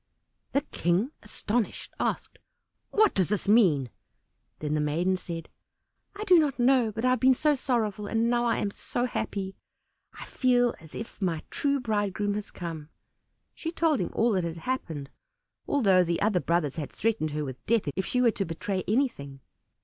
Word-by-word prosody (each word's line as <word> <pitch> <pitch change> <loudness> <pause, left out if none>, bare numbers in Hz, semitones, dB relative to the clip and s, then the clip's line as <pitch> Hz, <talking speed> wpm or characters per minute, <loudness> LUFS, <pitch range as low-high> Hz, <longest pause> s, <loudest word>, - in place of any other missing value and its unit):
The 280 - +3
King, 195 - 0
astonished, 215 +1 -2
asked, - - -2 0.5
"What 430 -1 +4
does 185 -3 +1
this 210 -1 -1
mean?" 170 - +4 0.7
Then 150 -1 -3
the 155 - +1
maiden 165 +6 +1
said, 170 -3 -6 0.7
"I 415 - -4
do 365 -5 +6
not 295 -4 +1
know, 245 -2 +3
but 225 +3 -3
I 255 - +4
have 255 - +2
been 260 +1 +5
so 300 +3 +3
sorrowful 220 -6 -1
and 225 +2 +1
now 240 0 +2
I 235 - +2
am 200 - -1
so 245 +4 -2
happy! 195 -5 -3 0.6
I - - -9
feel 245 -2 +2
as 160 -1 -14
if 225 - -8
my 170 -4 -1
true 280 -1 +1
bridegroom 205 -3 -1
had 205 0 -5
come." 160 -4 -6 0.6
She 325 - -5
told 325 -4 +2
him - - -2
all 230 +1 +2
that 185 -4 +1
had 170 0 -4
happened, 160 - -4 0.6
although 195 -10 +4
the 170 -1 -1
other 205 -3 +2
brothers 170 -5 0
had 150 -3 -4
threatened 220 -8 0
her 150 0 -3
with 130 -2 -8
death 225 -6 +2
if 190 - -2
she 250 - +1
were 240 -2 +5
to 200 - -2
betray 185 +2 -3
anything. 195 - -1
210 Hz, 180 wpm, -28 LUFS, 170-245 Hz, 0.7 s, do